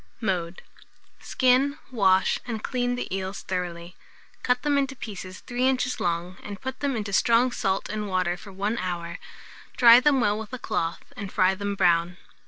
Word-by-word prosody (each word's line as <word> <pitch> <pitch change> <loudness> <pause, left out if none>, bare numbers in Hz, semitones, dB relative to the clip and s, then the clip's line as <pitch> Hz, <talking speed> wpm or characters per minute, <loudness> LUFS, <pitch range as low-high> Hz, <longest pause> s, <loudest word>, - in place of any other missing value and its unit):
Mode. 180 -5 -2 0.6
Skin, 260 +3 +2
wash, 190 -5 +3
and 225 -3 -4
clean 245 -1 -1
the 245 -6 -4
eels 195 +1 -5
thoroughly; 180 -1 -4 0.5
cut 250 0 +1
them 295 -1 +2
into 275 -1 0
pieces 190 -6 -8
3 250 +1 -1
inches 255 -1 0
long, 175 +1 -2
and 205 -1 -8
put 260 0 -6
them 280 -2 -1
into 205 -3 -4
strong 235 +5 +4
salt 195 -4 -1
and 210 0 -4
water 185 -2 0
for 195 +3 -12
1 205 +4 -2
hour; 170 -2 -4 0.6
dry 235 -1 +9
them 275 +1 +3
well 210 -3 +1
with 220 +3 -8
a - - -2
cloth, 165 -7 -3
and 200 -1 -6
fry 185 -1 +3
them 200 +1 -3
brown. 175 -1 +2
205 Hz, 175 wpm, -25 LUFS, 185-250 Hz, 0.6 s, dry